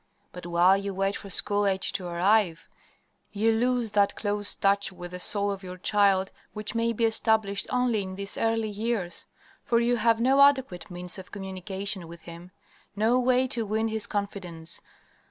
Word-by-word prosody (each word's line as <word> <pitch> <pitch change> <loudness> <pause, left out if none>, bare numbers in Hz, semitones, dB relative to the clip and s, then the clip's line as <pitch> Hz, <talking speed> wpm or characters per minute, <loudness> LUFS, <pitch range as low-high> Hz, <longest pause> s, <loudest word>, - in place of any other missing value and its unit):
But 180 -1 -9
while 175 +2 +4
you 200 -1 -4
wait 195 +1 0
for 200 - -8
school 205 +2 +1
age 190 -1 0
to 180 - -3
arrive, 180 0 +1 0.6
you 215 +2 +2
lose 240 0 +1
that 205 -1 +2
close 205 -1 -2
touch 200 0 +2
with 175 -1 -9
the 180 - -6
soul 205 +2 +1
of 195 -1 -5
your 185 -1 -8
child 195 0 +2 0.2
which 210 0 -4
may 230 0 +1
be 230 0 +1
established 220 -3 +1
only 250 -4 +1
in 190 -1 -6
these 200 +1 -2
early 225 -1 0
years, 205 -4 -2 0.4
for 235 - +2
you 240 +1 +2
have 230 0 +3
no 265 +4 +4
adequate 265 -10 +3
means 180 +1 -2
of 185 - -12
communication 190 -1 -4
with 170 0 -11
him 170 +1 -11 0.5
no 225 +4 +2
way 255 +1 +3
to 235 - 0
win 220 +1 -1
his 220 -1 -1
confidence. 185 -5 -4
200 Hz, 175 wpm, -27 LUFS, 185-225 Hz, 0.6 s, while